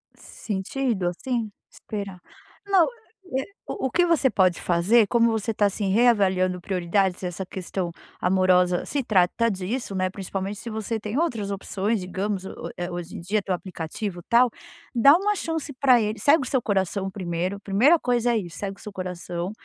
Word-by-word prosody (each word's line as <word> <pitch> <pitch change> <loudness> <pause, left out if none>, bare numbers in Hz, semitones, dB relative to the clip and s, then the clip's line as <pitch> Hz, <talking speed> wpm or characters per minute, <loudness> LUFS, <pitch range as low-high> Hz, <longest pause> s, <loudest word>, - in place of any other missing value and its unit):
Sentido, 205 0 -3
assim? 230 +5 -2 0.2
Esperar. 200 -4 -6 0.5
Não, 385 -4 +5 0.5
eh, 270 - -1 0.2
o 265 - -2
que 350 +6 +3
você 315 -6 +3
pode 185 -5 +2
fazer, 200 +6 +3
como 235 +1 +3
você 220 0 -1
tá, 205 -1 +3
assim, 200 0 -2
reavaliando 190 -5 +3
prioridades, 185 +1 0
essa 180 +1 -4
questão 185 -1 -4 0.3
amorosa 180 -1 +3
se 285 -2 -2
trata 215 +2 +2
disso, 200 +2 -3
né, 185 0 +1
principalmente 195 +1 -4
se 235 - -7
você 220 +1 -3
tem 210 +3 -4
outras 235 -11 0
opções, 200 +2 -1
digamos 190 +1 -3
o - - -7
eh 175 0 -3
hoje 175 0 -6
em - - -6
dia 205 +5 0
tem 195 - -2
o - - +2
aplicativo, 180 +2 -5
tal. 240 +1 +5 0.4
Dá 275 +5 +7
uma 415 +3 +1
chance 325 -5 -3
pra 255 -2 +4
ele 215 +1 -2
segue 290 0 +4
o - - -5
seu 260 - +1
coração 195 -2 -1
primeiro. 185 0 -3
Primeira 240 +13 +4
coisa 245 -2 +1
é - - +2
isso, 175 -6 -5
segue 195 -1 -4
o - - -14
seu 210 - -7
coração, 180 -1 -4
200 Hz, 175 wpm, -25 LUFS, 185-235 Hz, 0.5 s, Dá